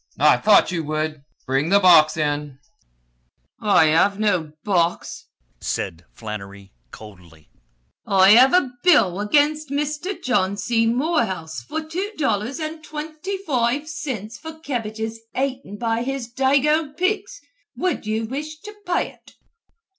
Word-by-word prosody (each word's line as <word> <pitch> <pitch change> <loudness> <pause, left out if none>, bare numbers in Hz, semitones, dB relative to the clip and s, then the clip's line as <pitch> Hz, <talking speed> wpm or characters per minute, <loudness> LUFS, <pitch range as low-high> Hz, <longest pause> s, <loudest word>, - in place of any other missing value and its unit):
I - - +5
thought 210 -3 +4
you 170 -3 -2
would! 155 0 -3 0.2
Bring 135 +4 0
the 200 +2 +5
box 170 -4 +6
in." 145 -2 -2 1.0
"I 205 -6 +4
hev 165 +6 +3
no 185 -8 0
box," 175 -4 -1 0.3
said 85 +2 -4
Flannery 100 -3 -9 0.2
coldly. 90 -7 -15 0.6
"I 195 0 +6
hev 250 +5 +7
a 285 -9 +2
bill 205 - +4
agin 290 +8 +3
Misther 300 +7 -2
John 200 -6 0
C. 230 +3 +1
Morehouse 230 - -1
for 315 - -5
two 370 +7 -4
dollars 240 -3 -1
and 315 0 -6
twinty 310 +5 -6
foive 255 +1 0
cints 240 -8 -6
for 320 0 -8
kebbages 225 -7 -5 0.2
aten 260 -5 -3
by 230 0 -1
his 250 -2 -4
dago 285 +3 +1
pigs. 400 +6 -1 0.4
Wud 365 -11 -2
you 220 +1 -1
wish 300 +6 -6
to 420 0 -10
pay 355 - 0
ut?" - - -21
230 Hz, 130 wpm, -22 LUFS, -, 1.0 s, hev